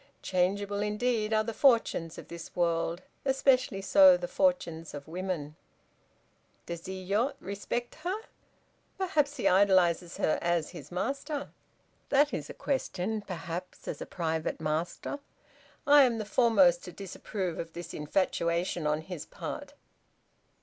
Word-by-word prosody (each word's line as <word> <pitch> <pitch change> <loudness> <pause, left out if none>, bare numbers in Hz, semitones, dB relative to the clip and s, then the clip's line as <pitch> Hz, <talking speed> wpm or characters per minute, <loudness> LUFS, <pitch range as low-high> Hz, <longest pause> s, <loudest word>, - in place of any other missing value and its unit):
Changeable 200 +2 0
indeed 215 +1 0
are 215 0 +3
the 230 +1 -4
fortunes 230 - +3
of - - -9
this 170 -1 -9
world, 170 0 0 0.2
especially 265 -6 +2
so 190 -2 +7
the 175 0 -4
fortunes 170 - 0
of 140 -1 -8
women!" 165 -3 -4 1.1
"Does 170 -1 -5
Iyo 195 +7 0
respect 225 +3 -4
her? 380 +5 -2 0.8
Perhaps 300 -6 +1
he - - +1
idolizes 185 -3 +4
her, 155 - +1
as 170 -2 0
his 145 +2 -10
master." 275 - -3 0.6
"That 290 +1 +4
is 150 - -4
a - - -8
question, 220 -6 -2
perhaps, 180 -2 -6
as - - -4
a - - -5
private 160 -2 -2
master. 160 - -2 0.7
I 290 0 +8
am 245 -4 +4
the 215 - -3
foremost 200 -6 +4
to 180 - -7
disapprove 190 -1 -5
of 165 0 -5
this 170 -1 -7
infatuation 170 +1 0
on 150 +1 +1
his 170 -1 -7
part." - - -7
185 Hz, 135 wpm, -30 LUFS, 170-230 Hz, 1.1 s, I